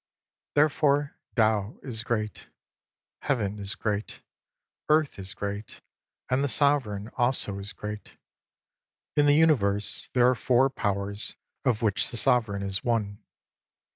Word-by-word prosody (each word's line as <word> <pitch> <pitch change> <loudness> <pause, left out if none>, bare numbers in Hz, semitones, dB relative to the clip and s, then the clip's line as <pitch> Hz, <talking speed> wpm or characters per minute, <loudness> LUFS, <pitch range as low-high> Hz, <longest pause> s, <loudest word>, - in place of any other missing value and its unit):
Therefore 145 -1 +2 0.2
Tao 110 -2 +1
is 115 -4 -3
great; 110 -3 -3 0.7
Heaven 105 -7 -1
is 100 +1 -3
great; 105 -1 -3 0.7
Earth 155 -6 +2
.s 95 0 -5
great; 100 +1 -5 0.5
and 130 +2 +1
the - - +2
Sovereign 125 -8 +1
also 120 -5 +2
is 100 +1 -6
great. 105 0 -8 1.0
In 145 -1 +4
the 145 - +5
Universe 105 -11 +2
there 125 -1 +5
are 130 - +5
four 130 +2 +2
powers, 100 -1 -1 0.3
of 120 -4 +1
which 105 -3 +2
the 120 - -4
Sovereign 110 -6 +2
is 100 0 -2
one. 105 -4 -1
110 Hz, 125 wpm, -27 LUFS, 100-135 Hz, 1.0 s, the